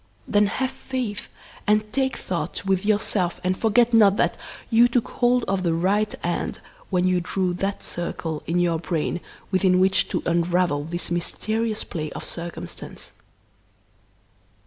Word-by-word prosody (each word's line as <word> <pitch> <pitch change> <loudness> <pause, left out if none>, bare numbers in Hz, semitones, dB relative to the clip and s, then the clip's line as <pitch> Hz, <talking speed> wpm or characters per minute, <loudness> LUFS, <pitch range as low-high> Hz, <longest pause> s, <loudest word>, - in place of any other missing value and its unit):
Then 205 -1 +4
have 260 +6 -1
faith 245 -6 -4 0.4
and 210 0 +2
take 265 -1 +1
thought - - -4
with 195 +1 +1
yourself 205 -4 +1
and 185 +1 +1
forget 235 +3 +3
not 205 -3 +6
that - - +2 0.4
you 235 +1 +7
took 240 -1 0
hold 245 0 +2
of 195 -1 0
the 170 -3 +1
right 200 +5 +2
end 175 0 -2 0.3
when 180 -1 +2
you 185 -1 +2
drew 180 +1 -1
that 195 +3 -2
circle 165 -2 -4
in 170 - 0
your 170 -2 +2
brain 165 0 -1 0.3
within 185 -1 +3
which 190 +1 +3
to - - -1
unravel 170 -3 +1
this 175 +2 -3
mysterious 215 +6 -1
play 155 -4 -4
of - - -6
circumstance. 170 0 -7
190 Hz, 145 wpm, -24 LUFS, 175-215 Hz, 0.4 s, you